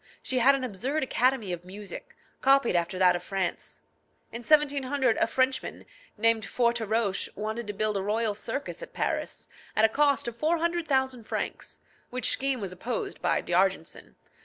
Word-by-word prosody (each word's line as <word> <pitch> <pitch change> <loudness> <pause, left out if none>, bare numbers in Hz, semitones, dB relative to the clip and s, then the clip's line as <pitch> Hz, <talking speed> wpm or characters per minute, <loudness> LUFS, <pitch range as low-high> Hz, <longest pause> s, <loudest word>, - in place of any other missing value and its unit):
She 255 - 0
had 270 +3 +6
an 270 - -3
absurd 255 +7 -2
academy 255 -6 +1
of 175 0 -6
music, 205 - -9 0.3
copied 270 -6 +4
after 175 +1 0
that 180 -1 +5
of 175 - -3
France. 175 - -3 0.5
In 235 - -6
1700 280 -2 +2
a - - +2
Frenchman, 260 +2 -1 0.3
named 225 +1 +3
Foretroche, 225 -4 0
wanted 220 +2 -4
to 205 - -3
build 215 0 0
a - - -1
royal 215 +2 0
circus 280 - -5
at - - -9
Paris, - - -2 0.3
at 215 - +5
a - - +4
cost 285 +1 +2
of 235 - -4
400,000 305 -6 0
francs, - - -4 0.3
which 250 -1 +1
scheme 270 -1 0
was 195 -4 -4
opposed 225 +6 -4
by - - +1
D'Argenson. 175 - -1
230 Hz, 160 wpm, -28 LUFS, 200-270 Hz, 0.5 s, had